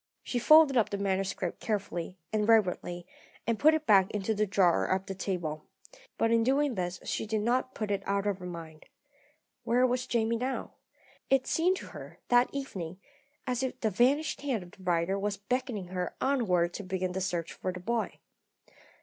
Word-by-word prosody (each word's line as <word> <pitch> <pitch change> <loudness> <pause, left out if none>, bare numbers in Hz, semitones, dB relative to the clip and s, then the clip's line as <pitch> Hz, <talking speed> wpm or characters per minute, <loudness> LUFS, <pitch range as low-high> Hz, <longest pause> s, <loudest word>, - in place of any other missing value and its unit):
She 245 - -2
folded 305 0 +7
up 225 - +3
the 200 - -2
manuscript 195 -2 -2
carefully 190 -4 -3 0.2
and 215 0 +1
reverently, 180 -5 +2 0.4
and 230 -1 0
put 310 +1 +6
it 310 -1 -3
back 195 -5 +5
into 210 +1 -1
the 210 0 0
drawer 185 -3 +3
of 190 +1 0
the 195 - -4
table. 175 -5 -3 0.5
But 225 - +2
in 230 0 +4
doing 275 +2 +2
this 180 -3 -3
she - - -3
did 215 0 0
not 250 +3 0
put 215 -2 -3
it 200 - 0
out 200 0 0
of 200 -2 -1
her 180 - -7
mind. 165 -3 -9 0.8
Where 245 +2 +3
was 250 0 0
Jamie 230 -1 +1
now? 255 +3 -3 0.6
It 265 -1 +3
seemed 360 +3 +2
to - - -8
her, - - -10
that 245 0 +5
evening, 190 -11 -5 0.5
as 250 0 -1
if 260 -1 -3
the 220 - 0
vanished 280 - +2
hand 260 -9 -1
of 175 - -14
the 195 - -17
writer 180 +2 0
were 205 +1 -1 0.2
beckoning 245 -7 -2
her 180 -1 -3
onward 185 -11 +1
to 205 - -5
begin 185 -1 -2
the 190 +1 -3
search 175 -3 -2
for 185 - -3
the 180 - -7
boy. 230 +5 -2
205 Hz, 190 wpm, -30 LUFS, 185-245 Hz, 0.8 s, folded